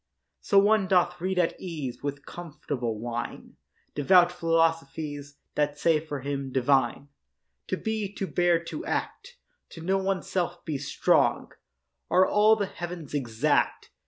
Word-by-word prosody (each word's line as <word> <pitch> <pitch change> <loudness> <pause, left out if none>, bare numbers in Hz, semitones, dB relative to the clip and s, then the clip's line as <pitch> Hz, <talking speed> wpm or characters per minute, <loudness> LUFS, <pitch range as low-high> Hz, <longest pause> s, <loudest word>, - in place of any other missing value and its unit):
So 200 - +1
one 205 0 +4
doth 180 -1 +2
read 190 +1 -1
at 175 -2 +2
ease 155 -9 -5
With 140 0 -5
comfortable 145 -9 -5
wine 120 +1 -6 0.4
Devout 175 +4 +5
philosophies 160 -4 -1 0.2
That 145 0 0
say, 160 0 +3
for 150 -3 -6
him, 140 -1 -4
divine, 135 +1 +1 0.6
To - - -1
be, 220 -3 -3
to 195 - -2
bear, 175 -2 +2
to 305 - -6
act, 485 +6 -4 0.3
To 165 - -10
know 190 +4 +1
oneself, 185 -2 -2
be 150 -4 -3
strong, 140 - +1 0.6
Are 185 +1 +5
all 210 +2 +5
the 205 -2 -1
heav'ns 175 -5 -7
exact. 120 -6 0
165 Hz, 135 wpm, -27 LUFS, 140-185 Hz, 0.6 s, Devout